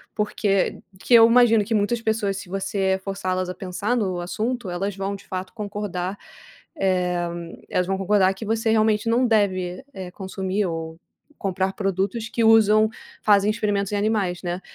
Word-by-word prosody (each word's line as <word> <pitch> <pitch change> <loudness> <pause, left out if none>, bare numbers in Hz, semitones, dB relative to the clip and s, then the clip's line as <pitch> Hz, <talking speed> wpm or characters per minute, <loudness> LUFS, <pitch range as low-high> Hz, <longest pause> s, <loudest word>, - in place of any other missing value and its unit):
porque 205 -2 0 0.2
que 245 - -1
eu 230 -1 +9
imagino 230 -2 +5
que 225 - -2
muitas 215 +3 0
pessoas 220 -3 0
se 200 -2 -9
você 195 0 -1
forçá-las 185 -2 -2
a - - -3
pensar 200 +5 -2
no 190 -6 -1
assunto, 220 +5 -3
elas 190 +3 -3
vão 195 +1 -3
de 200 - -13
fato 185 0 -5
concordar, 205 -3 -4 0.6
eh, 180 -4 0 0.4
elas 180 0 0
vão 195 0 0
concordar 195 0 +3
que 195 +3 -8
você 225 +1 0
realmente 220 0 +2
não 245 +2 +3
deve, 190 -3 0
eh, 185 -4 -7
consumir 190 +1 -3
ou 165 -1 -5 0.4
comprar 190 -1 -1
produtos 195 +3 -2
que 230 - -1
usam, 220 -1 +5 0.3
fazem 205 -1 +4
experimentos 205 -3 -1
em - - +1
animais, 200 -4 0
né. 175 +1 -3
200 Hz, 165 wpm, -23 LUFS, 185-215 Hz, 0.6 s, eu